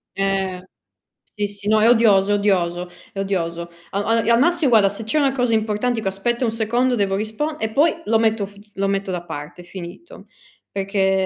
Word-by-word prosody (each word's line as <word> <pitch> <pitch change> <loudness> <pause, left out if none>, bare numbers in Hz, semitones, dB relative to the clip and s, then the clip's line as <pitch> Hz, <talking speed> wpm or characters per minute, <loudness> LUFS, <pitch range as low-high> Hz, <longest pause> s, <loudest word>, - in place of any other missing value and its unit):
Eh! 195 -2 -1 0.7
Sì, 205 -1 -1
sì, 205 0 -8
no 215 0 +4
è 230 - +5
odioso, 205 -4 +4
odioso. 180 -4 0 0.2
È - - -14
odioso. 170 -3 -2 0.2
A 200 +1 -1
al 225 +1 +2
e - - +3
al 235 - +5
massi 335 0 +3
guarda, 220 -5 +5
se 205 +3 -6
c'è 225 +8 -1
una 280 -2 +3
cosa 250 -3 0
importante 220 +3 0
dico: 220 - -2
"Aspetta 235 +6 -1
un 225 - 0
secondo, 235 +3 +1
devo 195 -3 0
rispon" 220 +10 -3
e 220 0 -2
poi 320 +5 +2
lo 225 0 +3
metto 220 -2 +1
f 200 - -15 0.2
lo 195 0 -1
metto 195 0 -1
da 180 -2 -3
parte, 150 +3 -8
finito. 180 - -10 0.4
Perché 195 -1 +1
205 Hz, 195 wpm, -21 LUFS, 195-230 Hz, 0.7 s, è